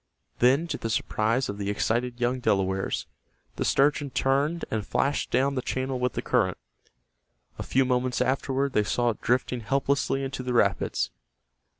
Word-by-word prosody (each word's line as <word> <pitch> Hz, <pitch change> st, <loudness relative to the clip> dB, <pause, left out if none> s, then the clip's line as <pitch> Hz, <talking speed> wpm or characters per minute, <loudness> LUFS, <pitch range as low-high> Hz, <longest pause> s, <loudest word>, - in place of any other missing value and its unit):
Then, 135 Hz, +7 st, +4 dB
to -, -, -3 dB
the 115 Hz, -, -3 dB
surprise 115 Hz, +3 st, 0 dB
of 100 Hz, 0 st, -5 dB
the 100 Hz, 0 st, -2 dB
excited 120 Hz, +4 st, -1 dB
young 125 Hz, +1 st, 0 dB
Delawares, 95 Hz, -4 st, 0 dB, 0.5 s
the -, -, 0 dB
sturgeon 145 Hz, +1 st, +2 dB
turned 140 Hz, +6 st, 0 dB
and 110 Hz, -2 st, -1 dB
flashed 140 Hz, +7 st, 0 dB
down 135 Hz, +3 st, +2 dB
the 130 Hz, -, -1 dB
channel 130 Hz, 0 st, -2 dB
with 125 Hz, 0 st, 0 dB
the -, -, -3 dB
current. 105 Hz, -8 st, +1 dB, 1.0 s
A -, -, -2 dB
few 135 Hz, 0 st, +2 dB
moments 125 Hz, 0 st, 0 dB
afterward 135 Hz, +1 st, 0 dB
they 105 Hz, -, +3 dB
saw 120 Hz, +3 st, +1 dB
it 110 Hz, -, -10 dB
drifting 125 Hz, +1 st, 0 dB
helplessly 135 Hz, +4 st, 0 dB
into 135 Hz, -1 st, -4 dB
the 125 Hz, -1 st, -3 dB
rapids. 100 Hz, -, +1 dB
125 Hz, 165 wpm, -26 LUFS, 110-135 Hz, 1.0 s, Then